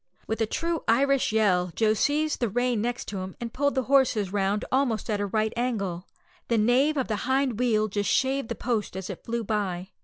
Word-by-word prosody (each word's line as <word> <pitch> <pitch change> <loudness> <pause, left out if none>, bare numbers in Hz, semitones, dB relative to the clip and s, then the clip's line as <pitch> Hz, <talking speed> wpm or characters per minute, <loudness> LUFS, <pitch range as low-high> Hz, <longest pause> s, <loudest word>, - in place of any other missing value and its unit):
With 220 +1 -3
a 225 - +2
truly 335 +7 -1
Irish 275 +3 +3
yell 185 -5 +2
Joe 220 -1 +3
seized 295 +7 0
the 240 - 0
rein 245 +1 0
next 240 0 -3
him, 190 -2 -5
and 235 -1 -5
pulled 285 +1 0
the 260 - +1
horses 245 -7 +2
round 200 +1 0
almost 245 -5 0
at 205 -1 0
a 205 - -1
right 215 +2 0
angle. 200 -8 -2 0.4
The 230 - +1
nave 255 +8 +3
of 265 - 0
the 215 - -1
hind 265 -4 +1
wheel 220 -4 +2
just 205 0 -2
shaved 270 -2 +1
the 235 - -2
post 220 -6 -2
as 190 +1 -5
it 185 - -10
flew 235 0 -2
by. 195 -4 -2
225 Hz, 210 wpm, -26 LUFS, 205-255 Hz, 0.4 s, Irish